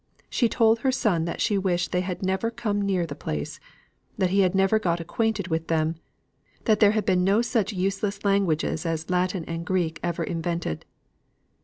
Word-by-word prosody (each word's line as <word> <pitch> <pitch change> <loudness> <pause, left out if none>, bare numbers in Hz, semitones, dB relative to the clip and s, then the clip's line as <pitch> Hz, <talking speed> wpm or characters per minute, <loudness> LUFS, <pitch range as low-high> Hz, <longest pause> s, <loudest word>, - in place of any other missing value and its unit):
She 240 -4 +2
told 225 -1 +3
her 265 +2 +1
son 205 -10 +1
that 170 - -4
she 205 -3 +2
wished 180 -2 0
they 180 - +1
had 185 +1 -4
never 190 +4 0
come 225 -3 -2
near 190 -3 +1
the 150 - -6
place; 75 - -5 0.6
that 185 -1 +1
he 200 - +3
had 185 -1 +3
never 195 +3 +3
got 175 -5 0
acquainted 200 +3 -1
with 160 0 -1
them; 160 0 +1 0.7
that 215 -3 +3
there 210 -1 +6
had 210 - 0
been 185 -3 +3
no 200 +5 +3
such 230 -3 0
useless 195 +1 -2
languages 190 -6 +1
as 165 +1 -3
Latin 180 -1 0
and 165 0 -4
Greek 175 -3 -1
ever 175 -1 -2
invented. 170 - -3
185 Hz, 185 wpm, -25 LUFS, 170-205 Hz, 0.7 s, there